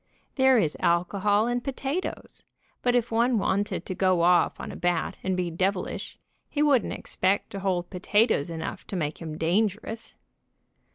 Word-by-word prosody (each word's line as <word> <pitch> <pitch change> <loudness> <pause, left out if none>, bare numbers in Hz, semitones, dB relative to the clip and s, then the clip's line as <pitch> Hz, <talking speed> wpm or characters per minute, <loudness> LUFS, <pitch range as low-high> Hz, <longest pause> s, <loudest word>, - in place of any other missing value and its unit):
There 265 -1 +5
is 160 -9 +1
alcohol 200 +5 +2
in 245 +1 0
potatoes, 275 +6 -4 0.4
but 245 0 +2
if 240 -1 +1
one 235 +2 +3
wanted 200 0 -1
to 185 - -3
go 185 -2 +2
off 175 0 +3
on - - -6
a - - -8
bat 175 -1 -1
and 190 -1 -1
be 175 -2 -1
devilish, 185 +3 -2 0.3
he 295 - 0
wouldn't 275 -6 +3
expect 190 +2 -1
to 195 - -5
hold 185 -2 -1
potatoes 195 - +2
enough 165 -1 -6
to - - -5
make 155 -4 -2
him 155 -2 -6
dangerous. 215 +6 -1
195 Hz, 160 wpm, -26 LUFS, 175-230 Hz, 0.4 s, There